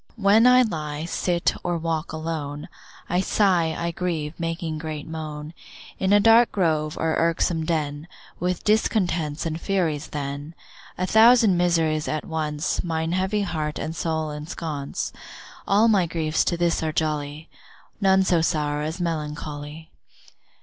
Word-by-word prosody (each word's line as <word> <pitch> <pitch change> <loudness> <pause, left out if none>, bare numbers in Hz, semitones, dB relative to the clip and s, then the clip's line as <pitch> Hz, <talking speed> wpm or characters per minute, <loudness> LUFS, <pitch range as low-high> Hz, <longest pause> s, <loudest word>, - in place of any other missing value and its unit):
When 220 +2 +5
I 250 0 +7
lie, 155 -7 -4
sit, 175 0 0
or 175 -1 -1
walk 165 -1 -2
alone, 155 -2 -5 0.4
I 180 +1 +1
sigh, 180 -6 +2
I 170 0 -2
grieve, 165 -4 -3
making 165 -1 -3
great 155 -2 -6
moan, 155 -1 -6 0.5
In 190 0 +1
a 205 - +7
dark 225 +3 +6
grove, 155 -5 0
or 160 0 0
irksome 165 -1 +1
den, 150 -2 -2 0.3
With 180 0 -2
discontents 175 -8 +1
and 160 0 -3
Furies 165 -7 -1
then, 145 +2 -5 0.4
A 185 - 0
thousand 225 -1 +6
miseries 165 -3 +1
at 155 -1 -2
once 155 -1 -2
Mine 160 -1 -2
heavy 190 +3 0
heart 155 -5 -3
and 160 - -4
soul 160 -2 -2
ensconce, 150 -1 -5 0.5
All 210 +3 +4
my 195 -6 +3
griefs 160 -1 0
to 170 - 0
this 170 -1 +1
are 160 -1 -1
jolly, 150 -1 -2 0.5
None 190 -1 +4
so 175 -3 +2
sour 150 -2 0
as 160 +4 -4
melancholy. 150 -1 -5
160 Hz, 145 wpm, -24 LUFS, 155-180 Hz, 0.5 s, I